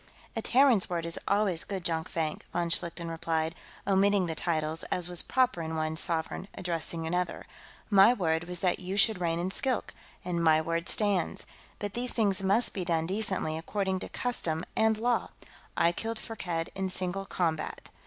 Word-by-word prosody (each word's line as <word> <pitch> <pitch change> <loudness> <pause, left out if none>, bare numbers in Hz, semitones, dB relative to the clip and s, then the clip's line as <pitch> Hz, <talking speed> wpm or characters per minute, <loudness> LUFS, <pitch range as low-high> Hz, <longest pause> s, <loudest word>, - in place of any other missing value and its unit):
"A 225 - -1
Terran's 250 -4 +4
word 170 -2 -2
is 170 - 0
always 200 -5 +2
good, 190 -3 -5
Jonkvank," 160 -1 -1
von 170 0 -1
Schlichten 170 0 +1
replied, 165 -1 -1 0.3
omitting 195 0 +3
the 165 - -2
titles, 160 -1 -1
as 180 -1 -1
was 175 -2 +1
proper 255 -9 +1
in 160 0 -3
one 155 0 -1
sovereign 165 +2 0
addressing 170 -2 -3
another. 180 +1 -2 0.5
"My 200 +3 +8
word 170 -7 0
was 180 -1 -5
that 180 -2 +2
you 185 +2 -4
should 215 -2 +3
reign 165 -1 +1
in 180 +2 -1
Skilk, 255 +3 -1 0.3
and 170 -2 -1
my 160 -1 +5
word 165 +2 -1
stands. 205 -5 0 0.3
But 205 -1 -4
these 245 +1 0
things 200 -5 +1
must 200 +5 +2
be 190 - -2
done 165 -2 0
decently, 190 -4 -1
according 190 +2 -1
to - - -7
custom 170 -10 -1
and 220 0 +3
law. 240 +2 +1 0.5
I 170 - +4
killed 225 +5 -3
Firkked 175 -8 -4
in 190 -1 -2
single 185 +1 -1
combat. 160 -5 -2
180 Hz, 175 wpm, -29 LUFS, 165-200 Hz, 0.5 s, My